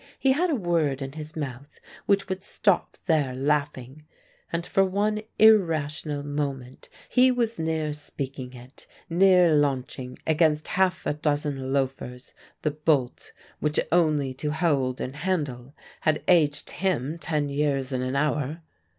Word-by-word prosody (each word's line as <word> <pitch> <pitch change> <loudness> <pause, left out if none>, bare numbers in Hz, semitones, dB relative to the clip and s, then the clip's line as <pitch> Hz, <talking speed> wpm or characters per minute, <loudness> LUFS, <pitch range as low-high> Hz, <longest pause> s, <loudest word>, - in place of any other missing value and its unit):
He 270 - +3
had 345 +7 +2
a 310 - +2
word 165 - 0
in 135 - -6
his 155 +1 -8
mouth 140 -2 -6 0.3
which 195 -1 +2
would 190 0 -4
stop 200 -2 0
their 150 -7 +1
laughing; 140 0 -1 0.5
and 170 0 -2
for 195 - +3
one 205 +3 0 0.2
irrational 155 -8 +3
moment 140 -3 -4 0.2
he 255 0 +5
was 235 -2 -1
near 160 -2 -1
speaking 135 -3 -6
it, 125 +2 -14 0.2
near 180 -1 +5
launching 130 -3 -1
against 155 -1 +2
half 185 0 +1
a - - +1
dozen 145 -3 -1
loafers 130 -2 -3 0.3
the 150 - +1
bolt 150 -4 0 0.3
which 150 0 0
only 155 -6 +2
to 150 +3 -3
hold 145 -6 0
and 135 +3 -5
handle 145 -7 -3 0.2
had 155 -1 0
aged 155 -5 +3
him 170 -5 -1
ten 150 -2 -1
years 140 -2 0
in 125 - -1
an 130 +1 -2
hour. 150 +2 -1
150 Hz, 140 wpm, -26 LUFS, 135-170 Hz, 0.5 s, he